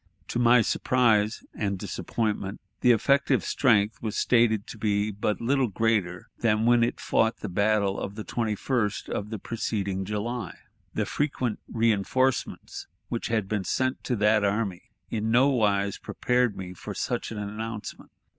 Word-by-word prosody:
To - - -1
my 120 0 +6
surprise 110 -3 +2
and 100 -2 -2
disappointment, 105 +1 -3 0.2
the 125 - +3
effective 140 +5 +3
strength 110 -5 +2
was 110 -2 -3
stated 115 -4 +3
to 110 - -10
be 105 0 +1
but 105 +1 -1
little 130 +2 +2
greater 100 -4 0
than 110 -1 +2
when 120 0 +5
it 120 - -1
fought 115 0 +1
the 105 - -4
battle 100 +1 +1
of 100 - -5
the 110 - -5
21st 110 -1 -1
of 105 - -3
the 110 - -4
preceding 100 -3 -2
July. 105 +5 -4 0.4
The - - 0
frequent 130 -6 -1
reënforcements 115 +4 0 0.2
which 120 - -2
had 110 -4 0
been 105 -1 -1
sent 130 +7 -1
to 125 - 0
that 105 0 +3
army 100 -3 -1 0.2
in 110 0 -1
nowise 110 -6 +2
prepared 125 -3 0
me 90 -1 -6
for 90 - -8
such - - -2
an 110 - -5
announcement. 105 +1 -6
110 Hz, 150 wpm, -27 LUFS, 100-120 Hz, 0.4 s, my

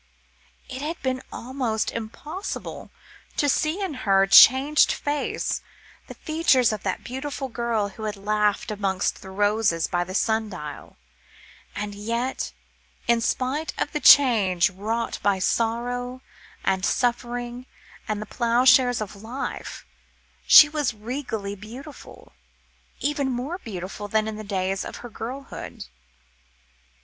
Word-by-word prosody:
It 260 - -7
had 320 +3 -4
been 260 -1 -1
almost 240 -3 -2
impossible 295 - -6 0.5
to 290 - +2
see 310 +7 +1
in 370 -5 -3
her 195 -4 +4
changed 265 +8 +7
face, 290 0 -2 0.5
the - - -9
features 295 -7 +2
of 210 - -5
the 190 - -1
beautiful 270 +1 -5
girl 230 -3 -1
who 215 +3 -8
had 210 -1 -3
laughed 210 +3 0
amongst 195 -3 -1
the 190 - -10
roses 205 -3 +1
by 175 0 0
the 185 +1 -7
sun 220 0 +1
dial, 150 -6 -9 0.8
and 205 0 -4
yet, 235 +5 -3 0.6
in 235 -1 +3
spite 265 +7 -2
of - - -1
the 300 - -2
change 210 -12 +6
wrought 220 +5 -3
by 200 -1 +2
sorrow, 245 +5 -1 0.4
and 190 -1 0
suffering, 245 +1 -1 0.4
and 215 -1 -2
the 215 - -5
ploughshares 245 +1 +4
of 210 -1 -5
life, 240 +5 -6 0.6
she 300 - +10
was 295 -6 -1
regally 220 -3 -4
beautiful, 235 +9 -11 0.7
even 285 -2 0
more 260 +8 -3
beautiful 205 - -6
than 215 +1 +1
in 220 - -4
the 215 - -7
days 195 -1 -2
of - - -7
her - - -7
girlhood. 255 +5 -7
230 Hz, 130 wpm, -24 LUFS, 205-260 Hz, 0.8 s, she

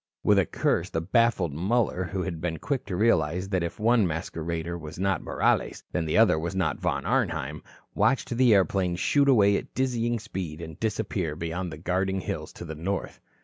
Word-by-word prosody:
With 105 -1 +5
a 90 - +2
curse - - 0
the 80 - -1
baffled 95 - +2
Muller, 95 +2 0
who 95 +1 -3
had 85 -4 -4
been 80 -2 -2
quick 135 - -3
to 90 - -3
realize 90 -3 +2
that 95 -3 0
if 85 +4 -4
one 115 -2 +4
masquerader 80 0 -3
was 80 -2 -8
not 95 -2 0
Morales, - - 0
then 85 -2 -1
the 75 - 0
other 100 -8 +5
was 85 +4 -4
not 95 - 0
Von 80 -6 -1
Arnheim, 80 - -1 0.3
watched 135 - +1
the 125 -1 +4
airplane 95 -2 +2
shoot 140 +10 +2
away 100 -6 +5
at - - -8
dizzying 120 -2 0
speed 90 -7 -6
and 80 -2 -8
disappear 100 -7 -2
beyond 85 +2 -4
the 80 - -7
guarding 95 +3 -1
hills - - -5
to - - -8
the 80 - -6
north. 95 +6 -4
90 Hz, 190 wpm, -27 LUFS, 80-105 Hz, 0.3 s, With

